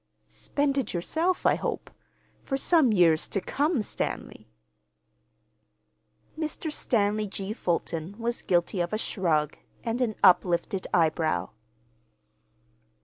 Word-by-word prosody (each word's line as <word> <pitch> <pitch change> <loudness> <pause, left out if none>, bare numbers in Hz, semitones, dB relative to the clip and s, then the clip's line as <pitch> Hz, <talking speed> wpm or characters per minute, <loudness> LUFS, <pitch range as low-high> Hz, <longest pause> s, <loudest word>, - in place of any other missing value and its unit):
"Spend 280 -1 -1
it 260 - -3
yourself, 325 - -1
I - - +5
hope—for 270 - -6
some 300 -3 +4
years 170 -5 +4
to 195 - -1
come, 285 - 0
Stanley." - - -5 1.9
Mr. 315 0 -3
Stanley 210 -4 +1
G. 195 +1 -5
Fulton 170 -2 -2
was 235 +1 -3
guilty 175 +1 +1
of 175 +4 -2
a - - +1
shrug 160 -9 0 0.2
and 235 +2 -2
an 225 -4 0
uplifted 185 0 +3
eyebrow. 160 - +1
205 Hz, 105 wpm, -27 LUFS, 175-260 Hz, 1.9 s, I